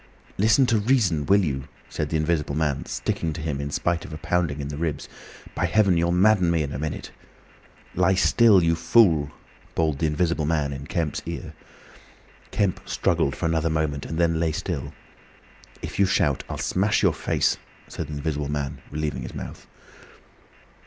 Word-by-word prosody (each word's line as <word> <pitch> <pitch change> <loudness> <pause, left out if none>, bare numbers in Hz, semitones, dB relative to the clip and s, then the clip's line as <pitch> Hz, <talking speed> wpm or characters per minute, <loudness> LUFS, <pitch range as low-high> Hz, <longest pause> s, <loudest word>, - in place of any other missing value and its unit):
"Listen 110 +6 +4
to 115 -3 +2
reason, 100 - +2
will 100 -1 +4
you?" 65 -2 -3 0.2
said 75 -1 -3
the 80 - 0
Invisible 75 -2 0
Man, 75 -3 -1
sticking 80 -2 -2
to 80 - -6
him 75 -3 -2
in 70 - -4
spite 85 +3 -1
of - - -10
a 75 - -5
pounding 85 -2 -1
in 70 0 -4
the 75 - -5
ribs. 80 -2 -3 0.5
"By 90 - 0
Heaven! 100 0 +3
you'll 85 +1 +2
madden 90 0 +4
me 85 -2 +2
in 70 - -5
a - - -4
minute! 75 0 -4 0.8
"Lie 95 +1 +3
still, 100 0 +5
you 85 0 +3
fool!" 80 -5 +4 0.5
bawled 80 -4 0
the 80 - +1
Invisible 75 0 0
Man 75 -3 0
in 70 +2 -7
Kemp's 85 -5 -2
ear. - - -6 1.0
Kemp 100 -4 0
struggled 70 - +1
for - - -3
another 80 0 +1
moment 75 -3 -1
and 80 - -4
then 85 -1 +2
lay 80 -1 +1
still. 70 -4 -4 0.9
"If - - -6
you 100 - +5
shout, 75 -7 +1
I'll - - -4
smash 100 +3 +1
your - - +4
face," - - 0 0.3
said - - -6
the 75 - -7
Invisible 75 -1 -3
Man, 75 -2 -3
relieving 75 0 -3
his - - -7
mouth. - - -8
80 Hz, 180 wpm, -24 LUFS, 75-90 Hz, 1.0 s, still